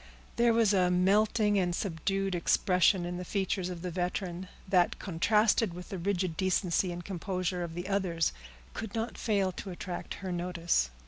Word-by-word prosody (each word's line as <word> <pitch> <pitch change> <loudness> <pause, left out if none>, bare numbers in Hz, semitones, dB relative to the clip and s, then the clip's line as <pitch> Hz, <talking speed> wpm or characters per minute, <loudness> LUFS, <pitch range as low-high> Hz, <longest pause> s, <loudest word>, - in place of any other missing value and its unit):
There 235 0 +4
was 225 -3 +3
a 180 -2 +3
melting 205 +3 +3
and 175 -2 0
subdued 195 +2 -1
expression 180 +1 +3
in 175 0 -4
the 180 - -4
features 190 -1 -1
of 175 -1 -6
the 180 - -3
veteran, 180 +1 -3 0.2
that, 180 -2 +3
contrasted 210 +2 +2
with 180 0 -9
the 190 - -5
rigid 185 -2 -1
decency 185 0 +1
and 175 0 -7
composure 185 -1 -2
of 165 -1 -6
the 175 +1 -4
others, 185 -5 0 0.4
could 220 -2 -6
not 225 +1 -2
fail 200 -4 +1
to 190 - -7
attract 180 0 -5
her 185 - -2
notice. 175 - 0
185 Hz, 170 wpm, -30 LUFS, 175-200 Hz, 0.4 s, There